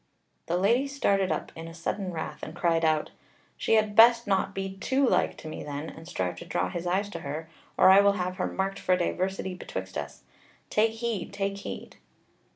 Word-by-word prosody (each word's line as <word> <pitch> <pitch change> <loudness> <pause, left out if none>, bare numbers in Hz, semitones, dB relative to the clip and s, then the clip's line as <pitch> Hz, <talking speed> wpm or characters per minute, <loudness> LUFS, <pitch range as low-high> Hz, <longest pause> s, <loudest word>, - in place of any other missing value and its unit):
The 175 - +1
Lady 235 +9 +3
started 200 -10 +1
up 155 - -2
in 165 0 -7
sudden 185 +3 -3
wrath, 160 -2 -5
and 155 - -7
cried 165 -2 +1
out: 155 -1 +2 0.4
"She - - +2
had 215 -1 +2
best 235 +1 +7
not 195 -1 0
be 195 0 -4
too 265 +7 +1
like - - +2
to - - -9
me 155 - -6
then, 145 +2 -5
and 165 +1 -12
strive 90 - -2
to - - -8
draw - - -1
his 175 0 -4
eyes 190 +3 +1
to 170 - -6
her, 155 +2 -5 0.3
or - - +8
I 195 +1 +8
will 200 0 +4
have 185 -1 -3
her - - 0
marked 195 +1 -2
for 185 - +2
diversity 185 +1 -1
betwixt 180 - -5
us. - - -8 0.5
Take 220 +1 +3
heed, 225 -4 -3
take 200 0 -2
heed!" - - -7
190 Hz, 200 wpm, -28 LUFS, 165-205 Hz, 0.5 s, or